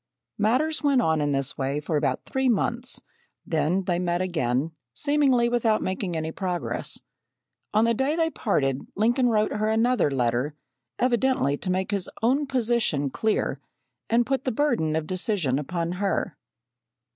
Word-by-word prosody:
Matters 265 Hz, +9 st, +1 dB
went 285 Hz, -3 st, +3 dB
on 160 Hz, -9 st, +2 dB
in 145 Hz, 0 st, +1 dB
this 135 Hz, -1 st, -1 dB
way 135 Hz, +2 st, -1 dB
for 155 Hz, +1 st, -3 dB
about 140 Hz, -3 st, 0 dB
three 265 Hz, -1 st, 0 dB
months; 235 Hz, +2 st, -1 dB, 0.4 s
then 160 Hz, +4 st, +1 dB
they 175 Hz, -1 st, 0 dB
met 175 Hz, -1 st, 0 dB
again, 155 Hz, -5 st, 0 dB, 0.2 s
seemingly 280 Hz, -5 st, +3 dB
without 235 Hz, -2 st, +1 dB
making 185 Hz, -2 st, -2 dB
any 160 Hz, 0 st, -3 dB
progress. 180 Hz, -1 st, -4 dB, 0.7 s
On 215 Hz, +2 st, +3 dB
the 230 Hz, -, +3 dB
day 265 Hz, +6 st, 0 dB
they 325 Hz, -1 st, +1 dB
parted, 135 Hz, -, 0 dB
Lincoln 240 Hz, +4 st, +2 dB
wrote 215 Hz, -1 st, +2 dB
her 215 Hz, +1 st, 0 dB
another 230 Hz, -3 st, +2 dB
letter, 125 Hz, +2 st, 0 dB, 0.4 s
evidently 245 Hz, -, +2 dB
to 185 Hz, -, -5 dB
make 185 Hz, +2 st, 0 dB
his 200 Hz, -3 st, -2 dB
own 275 Hz, +5 st, +2 dB
position 235 Hz, -, +1 dB
clear 220 Hz, +7 st, 0 dB, 0.5 s
and 235 Hz, +1 st, +3 dB
put 270 Hz, 0 st, -1 dB
the 260 Hz, -, 0 dB
burden 220 Hz, -, +1 dB
of 160 Hz, -1 st, -1 dB
decision 180 Hz, -, 0 dB
upon 170 Hz, +3 st, -2 dB
her. 195 Hz, -1 st, -1 dB
200 Hz, 155 wpm, -25 LUFS, 155-240 Hz, 0.7 s, went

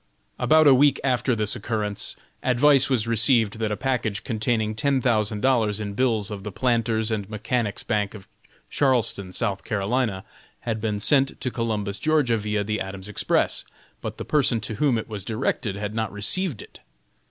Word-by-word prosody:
About 155 Hz, 0 st, +5 dB
a 140 Hz, -, +8 dB
week 140 Hz, +2 st, +4 dB
after 125 Hz, -2 st, +1 dB
this 105 Hz, -2 st, -1 dB
occurrence, 105 Hz, -2 st, -3 dB, 0.3 s
advice 135 Hz, +2 st, +4 dB
was 120 Hz, -5 st, +1 dB
received 115 Hz, -1 st, +2 dB
that 110 Hz, -1 st, -1 dB
a 105 Hz, -, -2 dB
package 115 Hz, -7 st, -1 dB
containing 110 Hz, -1 st, 0 dB
ten 135 Hz, +5 st, +1 dB
thousand 110 Hz, -4 st, +1 dB
dollars 115 Hz, -6 st, +2 dB
in 105 Hz, -1 st, -4 dB
bills 110 Hz, -3 st, +1 dB
of 100 Hz, -2 st, -5 dB
the 105 Hz, -, -5 dB
Planters' 115 Hz, -1 st, 0 dB
and 105 Hz, -3 st, -2 dB
Mechanics' 110 Hz, 0 st, -2 dB
Bank 105 Hz, 0 st, -1 dB
of 100 Hz, -2 st, -12 dB, 0.4 s
Charleston, 120 Hz, -8 st, +1 dB
S. 90 Hz, -, -7 dB, 0.3 s
C., 105 Hz, 0 st, -1 dB, 0.4 s
had 110 Hz, -2 st, -3 dB
been 105 Hz, -2 st, -1 dB
sent 135 Hz, +5 st, +2 dB
to 125 Hz, -, -2 dB
Columbus, 105 Hz, -4 st, -2 dB
Ga., 150 Hz, -4 st, +2 dB
via 105 Hz, -1 st, -1 dB
the 105 Hz, +1 st, -2 dB
Adams 95 Hz, 0 st, -6 dB
Express, 105 Hz, -, 0 dB, 0.4 s
but -, -, -5 dB
the -, -, -6 dB
person 135 Hz, -6 st, +2 dB
to 105 Hz, +1 st, -4 dB
whom 140 Hz, -6 st, +3 dB
it 110 Hz, -, -4 dB
was 105 Hz, -3 st, -5 dB
directed 110 Hz, -1 st, -2 dB
had 105 Hz, +1 st, -4 dB
not 110 Hz, -1 st, -2 dB
received 115 Hz, -, -1 dB
it. -, -, -16 dB
110 Hz, 175 wpm, -24 LUFS, 105-125 Hz, 0.4 s, a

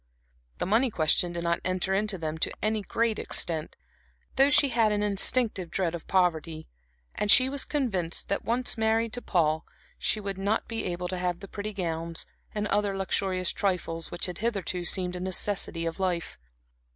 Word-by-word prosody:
The -, -, -2 dB
money 230 Hz, +7 st, +3 dB
question 170 Hz, -1 st, +2 dB
did 170 Hz, 0 st, -4 dB
not 170 Hz, 0 st, +1 dB
enter 185 Hz, +1 st, 0 dB
into 205 Hz, 0 st, 0 dB
them 160 Hz, -1 st, -4 dB
to -, -, 0 dB
any 215 Hz, 0 st, 0 dB
great 225 Hz, +2 st, 0 dB
extent, 160 Hz, -3 st, -1 dB, 0.6 s
though 270 Hz, +1 st, +5 dB
she 285 Hz, -1 st, +5 dB
had 230 Hz, -3 st, +3 dB
an 210 Hz, 0 st, 0 dB
instinctive 205 Hz, -2 st, +1 dB
dread 175 Hz, -2 st, -1 dB
of 170 Hz, -, -7 dB
poverty, 165 Hz, -4 st, 0 dB, 0.5 s
and 210 Hz, -, -2 dB
she 255 Hz, +4 st, +9 dB
was 280 Hz, 0 st, 0 dB
convinced 195 Hz, -, -1 dB
that, 200 Hz, -, 0 dB
if -, -, -24 dB
once 240 Hz, +1 st, -1 dB
married 220 Hz, +1 st, +1 dB
to 245 Hz, -, -3 dB
Paul, 160 Hz, -6 st, +1 dB, 0.4 s
she 215 Hz, -, 0 dB
would 195 Hz, -2 st, -5 dB
not 205 Hz, +3 st, 0 dB
be 225 Hz, -1 st, -3 dB
able 180 Hz, 0 st, -3 dB
to 185 Hz, 0 st, -3 dB
have 180 Hz, -1 st, -1 dB
the 195 Hz, -, -9 dB
pretty 205 Hz, +2 st, -5 dB
gowns, 165 Hz, -4 st, -3 dB, 0.3 s
and 210 Hz, 0 st, -2 dB
other 205 Hz, -1 st, +1 dB
luxurious 190 Hz, -1 st, 0 dB
trifles, 175 Hz, -4 st, -2 dB
which 175 Hz, -, -3 dB
had 180 Hz, -2 st, -6 dB
hitherto 195 Hz, -5 st, -2 dB
seemed 180 Hz, -1 st, +2 dB
a -, -, -4 dB
necessity 185 Hz, -2 st, -1 dB
of 165 Hz, +3 st, -4 dB
life. 180 Hz, -3 st, -2 dB
190 Hz, 185 wpm, -28 LUFS, 175-215 Hz, 0.6 s, she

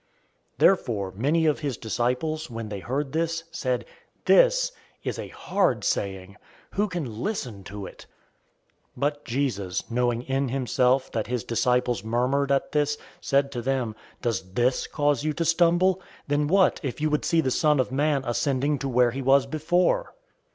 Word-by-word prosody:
006:060 -, -, -43 dB
Therefore 105 Hz, -, +2 dB
many 150 Hz, +9 st, +2 dB
of 150 Hz, -2 st, +2 dB
his 140 Hz, -6 st, -3 dB
disciples, 125 Hz, +8 st, -1 dB
when 115 Hz, -2 st, -6 dB
they 100 Hz, -1 st, -5 dB
heard 135 Hz, +6 st, -3 dB
this, 165 Hz, +1 st, -1 dB
said, 130 Hz, -7 st, -2 dB, 0.4 s
"This -, -, +5 dB, 0.3 s
is -, -, -3 dB
a -, -, -5 dB
hard 130 Hz, -, 0 dB
saying! 95 Hz, 0 st, -2 dB, 0.3 s
Who 205 Hz, +2 st, +1 dB
can 140 Hz, -, -5 dB
listen 125 Hz, -, -3 dB
to 100 Hz, +1 st, -7 dB
it?" -, -, -12 dB, 0.9 s
006:061 -, -, -14 dB
But 145 Hz, +1 st, -1 dB
Jesus 115 Hz, -8 st, -2 dB
knowing 120 Hz, 0 st, +1 dB
in 135 Hz, 0 st, -1 dB
himself 130 Hz, 0 st, +1 dB
that 110 Hz, -2 st, -2 dB
his 125 Hz, -1 st, -2 dB
disciples 125 Hz, -2 st, +1 dB
murmured 130 Hz, +5 st, +1 dB
at 135 Hz, -, +1 dB
this, 150 Hz, 0 st, +1 dB, 0.2 s
said 140 Hz, 0 st, +1 dB
to 120 Hz, -3 st, -4 dB
them, 125 Hz, -3 st, -1 dB, 0.3 s
"Does 100 Hz, -6 st, -2 dB
this 125 Hz, +4 st, +1 dB
cause 145 Hz, -3 st, +1 dB
you 155 Hz, 0 st, 0 dB
to 165 Hz, +2 st, -2 dB
stumble? 175 Hz, +3 st, +3 dB
006:062 -, -, -21 dB, 0.3 s
Then 145 Hz, 0 st, +2 dB
what 190 Hz, +3 st, +3 dB
if 135 Hz, -3 st, -4 dB
you 155 Hz, 0 st, 0 dB
would 150 Hz, -, +1 dB
see 165 Hz, -, +2 dB
the 130 Hz, -4 st, -1 dB
Son 150 Hz, +1 st, +3 dB
of 130 Hz, -, 0 dB
Man 145 Hz, 0 st, +1 dB
ascending 140 Hz, +3 st, 0 dB
to 135 Hz, -, -3 dB
where 125 Hz, -1 st, +3 dB
he 135 Hz, +3 st, -4 dB
was 135 Hz, +1 st, +4 dB
before? 175 Hz, -, +1 dB
135 Hz, 170 wpm, -26 LUFS, 120-155 Hz, 0.9 s, This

